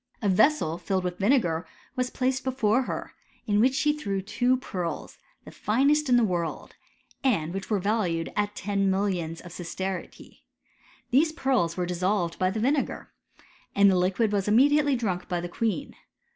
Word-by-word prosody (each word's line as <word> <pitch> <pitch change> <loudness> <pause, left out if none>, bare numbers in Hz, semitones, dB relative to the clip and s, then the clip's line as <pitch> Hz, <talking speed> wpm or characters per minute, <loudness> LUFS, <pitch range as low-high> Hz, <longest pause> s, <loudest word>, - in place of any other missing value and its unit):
A 210 - -1
Tessel 185 - +3
tolled 190 -2 0
wnh 180 0 -4
Tinegmr 195 -7 +2 0.3
was 250 -1 -1
placed 260 +1 -1
be 265 - -1
fore 245 -1 +2
ber« - - -5 0.3
in 205 -2 +2
which 255 +4 +3
she 295 +2 +2
threw 200 -10 -2
two 245 +6 +1
pearls, 180 -9 -5 0.3
the - - -10
finest 280 +6 +1
in 245 - +5
the 240 - +4
world, 175 -6 -2 0.5
and 180 - +1
which 195 +1 -5
were 210 - +2
valued 185 -5 -1
at 205 0 -1
ten 200 0 0
millions 185 -4 -1
of 175 - -11
sistertii: 180 +1 -6 0.7
these 300 +6 +4
pearb 255 - 0
were 180 - 0
dissohred 180 0 -1
bv 185 0 +2
the 220 - -3
vinegar,* 270 +5 -1 0.6
and 200 0 +6
the - - +2
liquid 190 +5 +1
was 200 -1 0
immediatelT 280 +5 +4
drunk 190 -6 -2
by 175 - -1
the 175 - -4
queen. 210 0 -2
205 Hz, 170 wpm, -26 LUFS, 180-255 Hz, 0.7 s, and